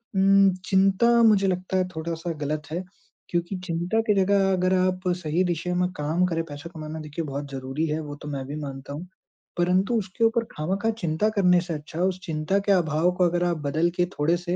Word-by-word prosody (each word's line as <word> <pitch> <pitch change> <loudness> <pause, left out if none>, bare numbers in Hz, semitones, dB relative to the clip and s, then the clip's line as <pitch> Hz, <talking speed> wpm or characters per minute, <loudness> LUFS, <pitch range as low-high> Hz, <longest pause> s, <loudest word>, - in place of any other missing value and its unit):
उम, 195 0 +5 0.2
चिंता 195 +3 +3 0.2
मुझे 205 -3 +5
लगता 185 0 -1
है 185 -1 +1
थोड़ा-सा 165 +1 -3
गलत 150 +1 -2
है 175 +3 -2 0.5
क्योंकि 175 +2 -1
चिंता 175 +5 -1
के 210 - +5
जगह 195 0 +3
अगर 185 0 +2
आप 185 0 +1 0.2
सही 170 +1 0
दिशा 175 0 -1
में 180 - +1
काम 155 +5 +1
करें 165 -1 -1
पैसा 145 +1 -9
कमाना 155 0 -6
देखिए 155 +2 -5
बहुत 140 0 -5
ज़रूरी 135 +3 -3
है, 155 +1 -1
वो 145 -1 -7
तो 150 - -8
मैं 135 -2 -4
भी 145 - -5
मानता 135 0 -7
हूँ। 165 +5 -7 0.5
परंतु 185 +6 +2
उसके 190 +3 -4
ऊपर 230 +1 +2
खामखाँ 195 +8 -1
चिंता 165 +6 +1
करने 180 -3 +4
से 175 -2 -5
अच्छा, 155 +2 -7
उस 185 0 +1
चिंता 160 +4 0
के 200 0 0
अभाव 170 -1 +2
को 180 - +4
अगर 175 +1 0
आप 170 -1 0
बदल 160 +4 +2
के 175 - +3
थोड़े-से 175 +4 0
175 Hz, 200 wpm, -25 LUFS, 155-190 Hz, 0.5 s, उम